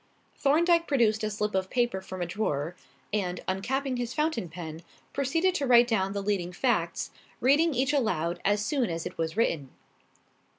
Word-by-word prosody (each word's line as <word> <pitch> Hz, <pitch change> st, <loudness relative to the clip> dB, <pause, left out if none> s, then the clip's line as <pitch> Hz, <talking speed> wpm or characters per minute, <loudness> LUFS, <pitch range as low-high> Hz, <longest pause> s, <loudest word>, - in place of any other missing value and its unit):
Thorndyke 335 Hz, +4 st, +3 dB
produced 225 Hz, -6 st, +2 dB
a 215 Hz, -, +1 dB
slip 210 Hz, 0 st, -2 dB
of 190 Hz, 0 st, 0 dB
paper 240 Hz, -6 st, 0 dB
from 185 Hz, -1 st, -5 dB
a -, -, -1 dB
drawer, 170 Hz, -4 st, -2 dB, 0.4 s
and, 185 Hz, -4 st, -1 dB
uncapping 255 Hz, +8 st, -1 dB
his 240 Hz, 0 st, -3 dB
fountain 300 Hz, -, 0 dB
pen, 160 Hz, -1 st, -7 dB, 0.3 s
proceeded 325 Hz, +7 st, +1 dB
to 285 Hz, -6 st, -1 dB
write 240 Hz, -1 st, +7 dB
down 195 Hz, -4 st, 0 dB
the 200 Hz, -1 st, -3 dB
leading 195 Hz, -4 st, -1 dB
facts, 175 Hz, -5 st, 0 dB, 0.3 s
reading 290 Hz, +4 st, +4 dB
each 265 Hz, +4 st, +1 dB
aloud 180 Hz, -, 0 dB
as 205 Hz, +1 st, +2 dB
soon 260 Hz, -3 st, 0 dB
as 165 Hz, 0 st, -3 dB
it 180 Hz, -, -7 dB
was 160 Hz, +3 st, -2 dB
written. 155 Hz, -, +1 dB
215 Hz, 170 wpm, -28 LUFS, 180-270 Hz, 0.4 s, write